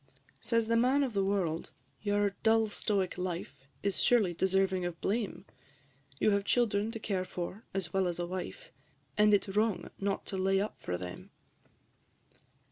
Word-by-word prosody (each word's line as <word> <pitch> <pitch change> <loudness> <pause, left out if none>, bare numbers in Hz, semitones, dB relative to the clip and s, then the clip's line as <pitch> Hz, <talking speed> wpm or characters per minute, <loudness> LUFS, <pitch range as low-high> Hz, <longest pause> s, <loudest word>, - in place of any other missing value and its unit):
III. - - -38
Says 230 -1 +1
the 230 - +2
Man 255 +5 +4
of 255 -4 -2
the 200 -1 +2
World, 185 -5 0 0.3
"Your 205 -1 +2
dull 225 -1 +4
stoic 195 -3 -1
life 175 -6 -5 0.2
Is 200 -1 0
surely 215 -8 +4
deserving 190 +1 +2
of 175 -1 -4
blame? 215 0 -2 0.7
You 215 - +3
have 200 0 +2
children 215 -2 +2
to 225 0 -5
care 195 -4 -1
for, 185 +4 -6
as 190 -3 -3
well 190 -1 +2
as 175 - -2
a 175 - -1
wife, 180 - -6 0.4
And 210 0 +5
it 205 - +5
's 195 - -6
wrong 215 -1 +1
not 195 0 -1
to 195 - -4
lay 195 +1 +3
up 205 +2 -3
for 90 - -2
them." 90 0 -8
195 Hz, 175 wpm, -32 LUFS, 185-215 Hz, 0.7 s, And